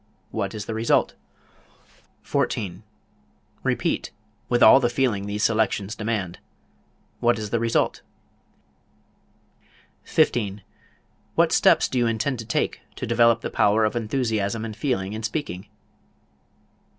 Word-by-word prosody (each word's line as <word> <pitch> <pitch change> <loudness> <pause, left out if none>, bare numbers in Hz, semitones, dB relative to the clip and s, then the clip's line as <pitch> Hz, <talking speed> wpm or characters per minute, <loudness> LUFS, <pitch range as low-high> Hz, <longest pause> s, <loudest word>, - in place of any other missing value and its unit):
What 100 +2 -3
is 105 - -5
the 115 - -4
result? 110 +1 +2 1.1
14. 90 -1 -2 0.8
Repeat, - - -1 0.4
with 120 0 +3
all 135 - +9
the 120 -3 +1
feeling 120 -6 0
these 105 +1 -2
selections 110 -2 +1
demand. 105 -5 -3 0.8
What 120 0 +2
is 105 -1 -5
the 115 - +1
result? 115 0 0 2.0
15. 105 -4 +1 0.7
What - - +3
steps - - +4
do 130 - -1
you 120 - +2
intend 115 +3 -1
to 115 - -6
take 110 - -1
to - - -4
develop 115 0 +3
the - - -4
power 110 +2 +3
of 110 - -1
enthusiasm 110 -2 -1
and 110 -2 -6
feeling 105 -5 -2
in 110 - -5
speaking? 110 - -4
110 Hz, 125 wpm, -24 LUFS, 105-115 Hz, 2.0 s, all